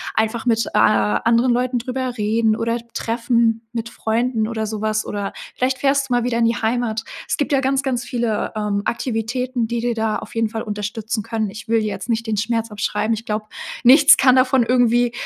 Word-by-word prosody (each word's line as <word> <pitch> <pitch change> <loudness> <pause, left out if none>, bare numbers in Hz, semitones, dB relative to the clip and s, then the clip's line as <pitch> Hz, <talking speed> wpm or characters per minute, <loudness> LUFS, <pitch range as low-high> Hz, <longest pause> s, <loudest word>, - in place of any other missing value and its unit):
einfach 220 +2 0
mit, 230 -2 +2
äh, - - -4
a 105 -1 +3
anderen 235 - +2
Leuten 250 +1 0
drüber 255 0 -4
reden 220 +1 +1
oder 230 +1 -1
treffen 230 -1 0
mit 230 -1 -4
Freunden 225 0 -1
oder 220 -1 -3
so 215 -1 -5
was 215 0 0
oder 200 -1 -4 0.2
vielleicht 260 +1 0
fährst 275 -1 +1
du - - 0
mal 245 -1 +2
wieder 240 -1 0
in 230 - +3
die 230 +1 +2
Heimat. 225 -1 -1 0.2
Es - - -1
gibt 290 - -1
ja 275 - +3
ganz, 270 +1 0
ganz 250 -3 -1
viele, 235 -4 -2
ähm, 205 -1 -1
Aktivitäten, 240 +1 -2
die 235 0 -2
dir 240 0 -1
da 220 -1 0
auf 215 - -11
jeden 225 0 +1
Fall 225 0 -4
unterstützen 210 +1 -4
können. 220 -2 -2
Ich 215 +4 -10
will 225 0 +2
dir 215 - -2
jetzt 210 - -5
nicht 230 0 -1
den 215 -2 -1
Schmerz 225 +1 -1
abschreiben. 210 +2 -1
Ich 225 +1 -9
glaube, 215 -1 -3 0.4
nichts 280 +4 +8
kann 260 -1 +5
davon 255 -1 +4
irgendwie 240 0 +3
230 Hz, 210 wpm, -20 LUFS, 220-245 Hz, 0.4 s, nichts